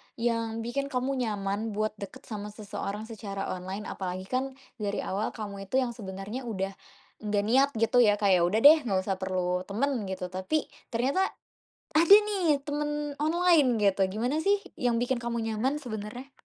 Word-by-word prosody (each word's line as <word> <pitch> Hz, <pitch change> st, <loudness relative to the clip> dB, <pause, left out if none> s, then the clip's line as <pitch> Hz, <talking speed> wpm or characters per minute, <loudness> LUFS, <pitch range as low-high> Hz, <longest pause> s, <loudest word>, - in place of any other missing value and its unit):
yang 230 Hz, -1 st, -1 dB
bikin 275 Hz, +4 st, -2 dB
kamu 265 Hz, 0 st, -1 dB
nyaman 210 Hz, -1 st, -2 dB
buat 215 Hz, +1 st, 0 dB
deket 230 Hz, +7 st, -8 dB
sama 210 Hz, -3 st, -6 dB
seseorang 210 Hz, 0 st, -5 dB
secara 200 Hz, -3 st, -5 dB
online, 185 Hz, +3 st, -5 dB
apalagi 185 Hz, -1 st, -4 dB
kan 260 Hz, +6 st, -2 dB, 0.2 s
dari 205 Hz, -1 st, -2 dB
awal 200 Hz, +3 st, -2 dB
kamu 200 Hz, -3 st, -6 dB
itu 225 Hz, -, -4 dB
yang 245 Hz, -, -2 dB
sebenarnya 210 Hz, +3 st, -6 dB
udah, 195 Hz, -3 st, -2 dB, 0.5 s
enggak 210 Hz, -1 st, 0 dB
niat 265 Hz, +6 st, +4 dB
gitu 230 Hz, +2 st, +3 dB
ya 210 Hz, -4 st, +6 dB
kayak 190 Hz, -4 st, +3 dB
udah 210 Hz, +5 st, +1 dB
deh 305 Hz, +3 st, +10 dB
enggak 190 Hz, -3 st, +1 dB
usah 190 Hz, -2 st, -2 dB
perlu 185 Hz, -1 st, -1 dB
temen, 235 Hz, +1 st, -1 dB
gitu. 185 Hz, -1 st, -4 dB
Tapi 190 Hz, +12 st, -2 dB, 0.2 s
ternyata 270 Hz, +11 st, +1 dB, 0.6 s
ada 335 Hz, +6 st, +8 dB
nih 375 Hz, -9 st, +2 dB
temen 295 Hz, 0 st, -2 dB
online 315 Hz, -4 st, +4 dB, 0.2 s
gitu, 195 Hz, 0 st, +1 dB
gimana 240 Hz, +10 st, -1 dB
sih 395 Hz, +5 st, +3 dB, 0.2 s
yang 245 Hz, -2 st, +2 dB
bikin 245 Hz, 0 st, 0 dB
kamu 235 Hz, 0 st, -3 dB
nyaman, 225 Hz, +5 st, 0 dB
sebenarnya? 240 Hz, +3 st, -6 dB
225 Hz, 165 wpm, -28 LUFS, 200-265 Hz, 0.6 s, deh